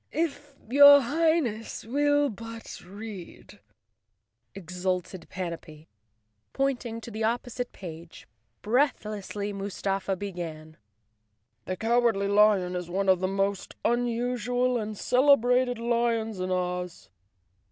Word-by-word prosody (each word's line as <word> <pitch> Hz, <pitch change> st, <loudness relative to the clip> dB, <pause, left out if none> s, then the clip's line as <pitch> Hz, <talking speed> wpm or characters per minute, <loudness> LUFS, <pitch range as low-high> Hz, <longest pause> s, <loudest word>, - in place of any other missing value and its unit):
"If 290 Hz, -3 st, -3 dB
your 285 Hz, +3 st, +9 dB
Highness 280 Hz, -7 st, 0 dB
will 290 Hz, +3 st, +2 dB
but 230 Hz, +2 st, -9 dB
read," 200 Hz, -1 st, -10 dB, 1.0 s
exulted 180 Hz, -1 st, -4 dB
Panapee, 165 Hz, -4 st, -7 dB, 0.6 s
pointing 245 Hz, -4 st, -1 dB
to 235 Hz, -, -9 dB
the 220 Hz, +1 st, -4 dB
opposite 245 Hz, +2 st, -2 dB
page. 165 Hz, -2 st, -10 dB, 0.4 s
Breathlessly 210 Hz, -4 st, -1 dB
Mustafa 195 Hz, 0 st, -2 dB
began. 170 Hz, -5 st, -7 dB, 0.9 s
"The 185 Hz, -, -3 dB
Cowardly 225 Hz, -3 st, +2 dB
Lion 200 Hz, -3 st, +4 dB
is 180 Hz, -1 st, -4 dB
one 195 Hz, +2 st, 0 dB
of 185 Hz, -1 st, +5 dB
the 185 Hz, -, 0 dB
most 195 Hz, 0 st, -2 dB
unusual 245 Hz, +1 st, 0 dB
and 215 Hz, -1 st, -5 dB
celebrated 250 Hz, -1 st, +3 dB
lions 230 Hz, -3 st, 0 dB
in 185 Hz, 0 st, -2 dB
Oz. 180 Hz, -, -3 dB
215 Hz, 100 wpm, -27 LUFS, 185-245 Hz, 1.0 s, your